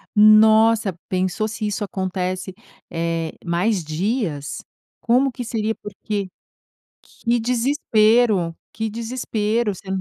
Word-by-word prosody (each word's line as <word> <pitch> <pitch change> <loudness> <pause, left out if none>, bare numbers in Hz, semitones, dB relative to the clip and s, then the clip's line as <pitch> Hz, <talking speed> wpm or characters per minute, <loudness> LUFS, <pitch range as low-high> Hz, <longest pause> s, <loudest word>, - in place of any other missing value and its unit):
Nossa, 215 -1 +6
pensou 185 +3 0
se 215 0 -4
isso 210 0 -2
acontece, 185 -1 -3 0.4
eh, 165 -1 -2
mais 180 +3 0
dias, 160 - -2 0.4
como 255 +3 +3
que 245 0 -6
seria? 220 -1 -1
Porque, 205 -2 -5 0.7
que 235 0 -1
desespero, 225 - +2 0.2
que 220 0 -3
desespero, 225 -2 -1
você 190 - -14
215 Hz, 100 wpm, -21 LUFS, 185-225 Hz, 0.7 s, Nossa